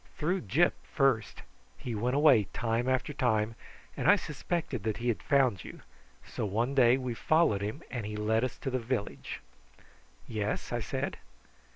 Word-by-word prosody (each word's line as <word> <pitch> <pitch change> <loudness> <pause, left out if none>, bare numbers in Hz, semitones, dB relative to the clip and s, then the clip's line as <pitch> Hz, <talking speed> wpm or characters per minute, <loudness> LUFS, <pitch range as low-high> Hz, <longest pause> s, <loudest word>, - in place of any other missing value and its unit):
"Through 175 +5 0
Gyp 160 - +4
first. 130 -8 0 0.3
He 120 - -5
went 120 +4 0
away 140 -8 +6
time 120 +1 0
after 130 +3 0
time, 115 -5 +1 0.4
and - - +1
I - - +9
suspected 150 - -3
that 110 +1 -2
he 120 +1 -1
had 115 - -1
found 130 - +2
you, - - -10 0.4
so 120 - -5
one 115 +6 0
day 125 -2 +5
we 130 -2 -3
followed 155 -5 +2
him 110 +10 -4
and 120 -4 -3
he 105 +1 -5
led 110 +2 +1
us 130 - -2
to 135 - -2
the 130 - 0
village." 115 -3 -4 0.9
"Yes?" 105 -2 -3
I - - 0
said. - - -3
120 Hz, 170 wpm, -30 LUFS, 110-135 Hz, 0.9 s, I